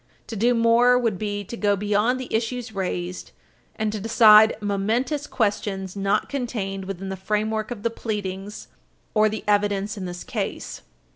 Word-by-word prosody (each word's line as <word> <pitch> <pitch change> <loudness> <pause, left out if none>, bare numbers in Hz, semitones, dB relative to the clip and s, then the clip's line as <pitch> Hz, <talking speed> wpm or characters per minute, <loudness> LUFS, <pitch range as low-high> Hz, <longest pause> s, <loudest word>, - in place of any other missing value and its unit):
To 225 - -7
do 240 +4 +2
more 235 +2 +5
would 230 -7 0
be 205 -1 -3
to 220 - -7
go 205 -3 +2
beyond 210 +5 +1
the 255 - -7
issues 230 +1 -2
raised, 180 -2 -4 0.5
and 215 -1 -1
to 215 - -4
decide 220 0 +6
momentous 225 +9 -1
questions 200 -5 -2
not 195 0 0
contained 210 -8 -4
within 195 0 -5
the 190 - -3
framework 215 +3 -1
of 230 -4 -6
the 230 - 0
pleadings 205 -3 -5 0.5
or 215 0 +4
the 215 0 -5
evidence 205 0 +1
in 190 - -5
this 180 0 -6
case. - - -4
210 Hz, 160 wpm, -24 LUFS, 195-230 Hz, 0.5 s, decide